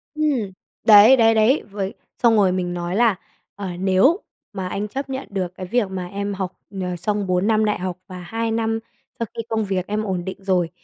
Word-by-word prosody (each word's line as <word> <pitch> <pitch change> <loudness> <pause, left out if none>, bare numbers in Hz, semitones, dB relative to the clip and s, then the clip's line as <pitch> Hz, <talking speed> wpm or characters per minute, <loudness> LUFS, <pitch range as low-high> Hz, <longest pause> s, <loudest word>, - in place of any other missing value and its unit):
Ừm, 280 -10 0 0.3
đấy, 220 +4 +9
đấy, 225 -1 +5
đấy, 225 +7 +3
với 200 -1 -3 0.3
xong 230 -1 +6
rồi 195 -3 +4
mình 180 -1 -2
nói 175 +1 -3
là, 230 -3 +4 0.4
ờ, 200 -1 -5
"Nếu 195 - +4 0.3
mà 190 -2 -4
anh 205 +3 -3
chấp 270 +5 -5
nhận 265 +1 -4
được 185 -2 -3
cái 185 - -6
việc 215 +1 0
mà 185 -2 -4
em 200 +1 -3
học, 190 -1 -3 0.3
ờ, 180 -1 -2
xong 205 +2 -2
4 185 +2 +1
năm 220 -1 +3
đại 210 - 0
học 180 -1 -3
và 185 -1 -8
2 225 +5 -3
năm 225 0 0 0.4
sau 230 - 0
khi - - -2
công 220 -1 0
việc 190 -2 -2
em 210 +1 -1
ổn 185 -4 -3
định 190 - -5
rồi, 180 -3 +1
200 Hz, 215 wpm, -22 LUFS, 185-225 Hz, 0.4 s, đấy